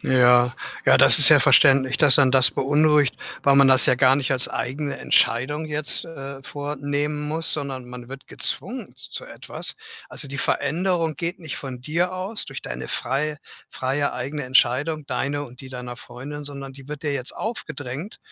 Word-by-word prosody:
Ja. 125 -1 +3 0.3
Ja, - - +4
das - - +8
ist - - +10
ja - - +6
verständlich, 135 -1 +3
dass 145 -2 +7
einen 135 -2 +3
das 130 -2 +6
beunruhigt, 145 0 +1 0.3
weil 140 0 +4
man 140 -1 +5
das 130 0 +8
ja - - +3
gar 130 +1 +3
nicht 135 -1 -2
als 130 -1 +6
eigene 140 +3 -5
Entscheidung 145 +7 0
jetzt, 150 +1 +1
äh, 140 -4 -10
vornehmen 145 +1 -5
muss, 160 +1 0
sondern 135 -4 -5
man 125 -1 -11
wird 135 +1 -12
gezwungen - - -2
z - - -11
zu - - -7
etwas. - - -2 0.3
Also, - - -7
die 140 +1 -8
Veränderung 165 +4 -2
geht 170 +5 -5
nicht 155 -2 -8
von 130 -3 -9
dir 170 +7 -2
aus, 190 +4 -2
durch 135 -1 -9
deine 60 +1 -8
frei 145 +4 -3 0.3
freie 140 +2 -3
eigene 145 +4 -6
Entscheidung, 140 +4 0
deine 145 +1 -4
und 125 -2 -15
die 130 - -12
deiner 125 -1 -9
Freundin, 145 +5 -10
sondern 140 -1 -8
die 135 0 -16
wird 150 -1 -8
dir 145 - -2
jetzt 130 -2 0
aufgedrängt. 155 - -7
140 Hz, 180 wpm, -21 LUFS, 130-150 Hz, 0.3 s, ist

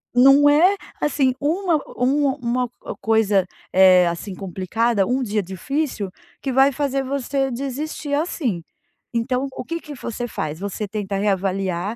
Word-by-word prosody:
não 275 +3 +7
é 345 +7 +5 0.3
assim, 275 -3 +2
uma 330 +2 +1 0.2
um 280 +4 +2
uma 250 -2 -1
co - - -7
coisa, 210 -4 +2 0.3
eh, 185 -1 +7
assim 180 +3 -4
complicada, 195 +3 0
um 255 +1 0
dia 210 -2 0
difícil 200 - -3 0.3
que 270 - -3
vai 270 +2 +5
fazer 275 -1 -1
você 270 0 -1
desistir 280 +4 -4
assim. 285 - -1 0.5
Então, 250 +3 0
o - - -5
que 335 +3 -3
que 300 - -9
você 240 0 -5
faz? 155 -7 -4
Você 200 +1 -4
tenta 205 -1 -4
reavaliar 195 0 -1
245 Hz, 145 wpm, -22 LUFS, 195-280 Hz, 0.5 s, não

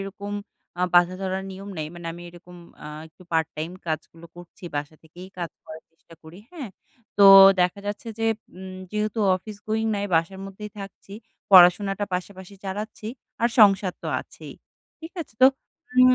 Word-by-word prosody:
এরকম 200 +1 -7 0.5
আ - - 0
বাধাধরা 185 +2 +2
নিয়ম 195 +1 -9
নেই। 155 - -3
মানে 170 -1 -9
আমি 175 +1 -10
এরকম 175 +1 -14 0.3
আ - - -7 0.2
একটু 160 - -20
পার্টটাইম 160 0 -1 0.2
কাজগুলো 165 +1 -5
করছি 175 +1 -14
বাসা 145 +2 -4
থেকেই 175 +3 -13
কাজ 170 -2 -4
করার 160 0 -10
চেষ্টা 165 0 -19
করি। 160 +3 -13
হ্যাঁ? 290 - -7 0.5
তো 205 - +4 0.4
দেখা 180 +3 +1
যাচ্ছে 210 +3 -5
যে, 225 - 0 0.3
উম 185 0 -9
যেহেতু 210 +1 -2 0.2
অফিস 210 +3 -10
গোয়িং 220 +1 0
নাই, 200 - -2
বাসার 165 +4 0
মধ্যেই 210 +2 -9
থাকছি, 195 0 -10 0.4
পড়াশোনাটা 195 +2 +6
পাশাপাশি 185 +1 -6
চালাচ্ছি 210 +3 -6 0.4
আর 235 - +4
সংসার 195 -3 +5
তো - - -5
আছেই। - - -12 0.5
ঠিক 320 +1 -9
আছে? 295 - -9
তো - - +11 0.5
উম 255 0 +7
190 Hz, 160 wpm, -24 LUFS, 175-205 Hz, 0.5 s, তো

